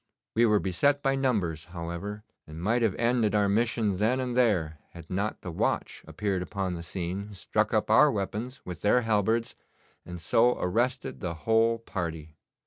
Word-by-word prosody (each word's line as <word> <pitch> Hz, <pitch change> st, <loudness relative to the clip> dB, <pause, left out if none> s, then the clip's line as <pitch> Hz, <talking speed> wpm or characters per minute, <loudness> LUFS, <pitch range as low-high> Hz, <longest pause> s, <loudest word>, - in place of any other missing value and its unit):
We 115 Hz, +1 st, +5 dB
were 105 Hz, -1 st, +4 dB
beset 140 Hz, +11 st, +1 dB
by 135 Hz, -, +2 dB
numbers, 100 Hz, -, 0 dB
however, 90 Hz, +4 st, -6 dB, 0.2 s
and 80 Hz, +1 st, -9 dB
might 110 Hz, +7 st, +1 dB
have 110 Hz, -5 st, +1 dB
ended 115 Hz, -3 st, +1 dB
our 105 Hz, -1 st, +3 dB
mission 110 Hz, -1 st, +1 dB
then 115 Hz, +6 st, +1 dB
and 125 Hz, -2 st, -2 dB
there 90 Hz, -11 st, +2 dB
had 85 Hz, -2 st, -11 dB
not 100 Hz, +4 st, -2 dB
the 90 Hz, -, -6 dB
watch 80 Hz, -, -1 dB
appeared 100 Hz, -2 st, -2 dB
upon 95 Hz, -1 st, -3 dB
the 85 Hz, -, -5 dB
scene, 95 Hz, +4 st, -4 dB
struck -, -, 0 dB
up -, -, +1 dB
our -, -, +6 dB
weapons 110 Hz, +6 st, -4 dB
with 90 Hz, -2 st, -7 dB
their 115 Hz, +4 st, +4 dB
halberds, 110 Hz, +1 st, +1 dB, 0.5 s
and 90 Hz, 0 st, -8 dB
so 120 Hz, +8 st, +3 dB
arrested 125 Hz, +7 st, -1 dB
the 85 Hz, -3 st, -4 dB
whole 115 Hz, +1 st, +3 dB
party. 80 Hz, -8 st, -5 dB
105 Hz, 170 wpm, -28 LUFS, 90-115 Hz, 0.5 s, our